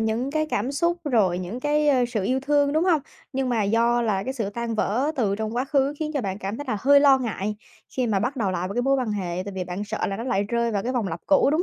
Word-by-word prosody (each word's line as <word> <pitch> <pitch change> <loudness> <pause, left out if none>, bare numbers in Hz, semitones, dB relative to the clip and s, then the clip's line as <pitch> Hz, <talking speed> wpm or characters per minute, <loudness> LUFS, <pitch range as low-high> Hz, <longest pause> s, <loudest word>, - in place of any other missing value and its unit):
những 225 +5 -1
cái 310 +1 0
cảm 250 -1 -2
xúc, 340 +4 +1
rồi 210 - +2
những 190 +8 -5
cái, 295 +1 +2
a, 255 -3 +4
sự 215 -5 -2
yêu 260 +5 +1
thương, 285 +1 +2
đúng 315 +3 +2
hông? 335 -5 +3 0.3
Nhưng 265 -1 -1
mà 230 -3 +1
do 235 +3 +2
là 200 -4 0
cái 260 - -2
sự 220 -6 -2
tan 235 +1 -3
vỡ 245 +8 0
từ 205 -6 +1
trong 220 +2 -3
quá 255 - +1
khứ 275 0 +1
khiến 310 -1 -2
cho 280 - +1
bạn 195 -2 -3
cảm 200 +2 -4
thấy 290 - -6
là 215 - 0
hơi 280 +1 +6
lo 275 -2 +6
ngại 210 -4 -3 0.4
khi 255 -2 +1
mà 210 -3 +1
bắt 250 +5 -2
đầu 210 -6 0
lại 180 0 -2
vào 200 - -6
cái 245 - +1
mối 275 +2 +3
quan 250 -5 -1
hệ, 185 -3 -3
tại 200 - -6
vì 185 -1 -3
bạn 180 +3 -4
sợ - - -2
là 195 - -3
nó 230 - -5
lại 200 -6 +1
rơi 235 0 0
vào 200 -2 -1
cái 250 +4 -2
vòng 230 -6 -1
lặp 165 0 -5
cũ, 290 -1 +4
đúng 315 +4 +2
235 Hz, 300 wpm, -24 LUFS, 205-275 Hz, 0.4 s, hơi